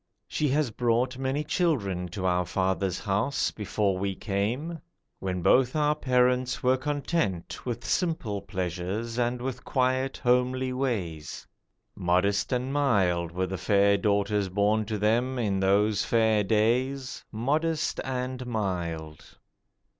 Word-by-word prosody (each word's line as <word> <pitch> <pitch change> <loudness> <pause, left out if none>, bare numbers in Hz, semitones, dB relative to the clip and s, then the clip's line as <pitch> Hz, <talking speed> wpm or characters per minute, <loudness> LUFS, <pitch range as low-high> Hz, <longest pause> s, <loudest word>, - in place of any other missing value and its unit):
She 150 - 0
has 140 -2 +1
brought 120 +3 0
many 135 +3 -1
children 105 - 0
to 95 +2 -5
our 90 0 +2
father's 95 0 -1
house 105 +7 0
Before 100 -2 -1
we 100 0 -1
came, 115 - -2 0.4
when 90 -2 -3
both 130 - +4
our 150 -1 +3
parents 125 -3 +1
were 130 +1 +4
content 140 - -2
With 120 -1 -3
simple 130 - -1
pleasures 95 +5 -3
and 120 +1 0
with 130 0 -4
quiet 130 0 0
homely 125 +1 +1
ways. 95 - -3 0.5
Modest 95 +4 +1
and 130 +2 -1
mild 95 - +2
Were 90 +2 -1
the 95 0 -5
fair 100 +3 +4
daughters 100 -1 +1
born 105 +3 +2
to 105 0 -3
them 120 +5 +1
in 100 -5 0
those 100 +2 +3
fair 110 -2 +3
days, 125 +6 0
Modest 155 +8 0
and 130 -1 -3
mild. 85 -8 -4
110 Hz, 130 wpm, -27 LUFS, 95-130 Hz, 0.5 s, both